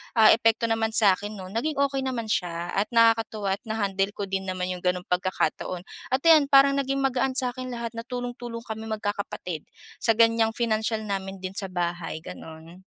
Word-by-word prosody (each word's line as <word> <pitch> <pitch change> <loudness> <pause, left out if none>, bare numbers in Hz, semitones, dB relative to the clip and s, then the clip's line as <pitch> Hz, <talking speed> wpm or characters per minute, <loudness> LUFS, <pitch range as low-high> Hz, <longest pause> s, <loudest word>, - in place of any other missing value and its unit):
ah, 220 -1 +7
epekto 230 0 +3
naman 225 0 +1
sa'kin 205 0 +3
nun 185 -1 -8
naging 300 +6 -1
okey 275 -1 +1
naman 235 -4 -3
siya 175 -1 -2
at 200 +2 0
nakakatuwa 225 -3 +3
at - - -43
na-handle 200 -2 -1
ko 200 - -4
din 190 0 -2
naman 185 0 -2
yung 180 - -4
gano'ng 180 0 0
pagkakataon. 180 0 -1 0.3
At 270 - -3
ayan, 315 -4 +6
parang 275 0 +6
naging 275 0 -1
magaan 260 0 +1
sa'kin 255 0 +1
lahat 235 -1 -4
na 230 0 -6
tulong-tulong 245 -2 -5
kami 220 0 -6
magkakapatid 205 -6 -4 0.4
sa 225 - +4
gan'yang 225 -1 +4
financial 220 -1 0
namin 195 -2 -4
din 185 - -3
sa 195 -2 -2
bahay 175 -2 -3
gano'n. 160 +2 -10
220 Hz, 175 wpm, -26 LUFS, 190-235 Hz, 0.4 s, ah